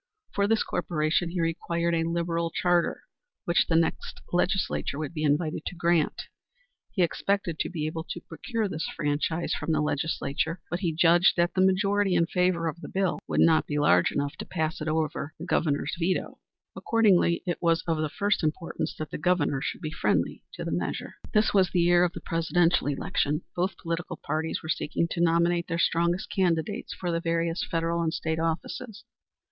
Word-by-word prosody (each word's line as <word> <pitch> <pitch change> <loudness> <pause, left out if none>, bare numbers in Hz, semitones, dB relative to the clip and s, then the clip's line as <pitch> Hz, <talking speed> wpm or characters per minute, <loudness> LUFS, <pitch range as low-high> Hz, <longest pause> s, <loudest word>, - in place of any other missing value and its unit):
For 200 0 +2
this 225 +1 +2
corporation 160 0 0
he 175 +1 -3
required 170 +1 -1
a 165 -1 +1
liberal 170 0 -1
charter, 175 0 +1 0.4
which 170 - +2
the 165 - +1
next 165 0 0
legislature 180 -4 0
would 155 +1 -4
be 155 - -4
invited 155 +2 +1
to - - -5
grant. 170 -2 +1 0.7
He 185 - +1
expected 175 -1 -1
to - - -1
be 155 -4 -3
able 160 +1 -3
to - - -4
procure 220 +7 -3
this 160 -4 -3
franchise 150 +3 -1
from - - -2
the 155 - +2
legislature, 150 +2 -1
but 175 - -1
he 175 -4 0
judged 170 +3 +4
that 175 0 +2
the 185 - +2
majority 195 0 +2
in 170 -1 +4
favor 180 -1 +1
of 165 +2 -4
the - - -7
bill 190 -2 0
would - - +1
not 160 -1 +4
be 145 - -2
large 145 0 +4
enough 145 +2 -2
to - - -6
pass 160 -2 -2
it 155 - -3
over 155 -1 -1
the - - -7
Governor's 145 -2 0
veto. 180 +2 -1 0.4
Accordingly 200 -7 +3
it 175 -2 -2
was 165 -1 +2
of 165 -2 0
the 155 -1 -1
first 200 +3 0
importance 155 +2 -2
that 155 -2 -5
the - - -4
Governor 150 -5 +1
should - - -4
be 155 -2 -4
friendly - - 0
to - - -6
the - - -3
measure. - - -3
This 215 -1 +3
was 190 -3 +4
the 180 - 0
year 175 +1 +5
of 180 0 +1
the - - -7
Presidential 165 -1 +1
election. 145 +2 -1
Both 180 +2 -1
political 170 0 -4
parties 160 +1 -3
were 160 - -7
seeking 165 +1 0
to 170 - -1
nominate 170 0 +2
their 165 - -2
strongest 170 +2 +1
candidates 170 -5 0
for 175 -2 -3
the 165 - 0
various 165 0 0
federal 165 0 0
and 165 -1 0
state 160 0 -2
offices. 175 +7 -3
170 Hz, 190 wpm, -27 LUFS, 160-180 Hz, 0.7 s, year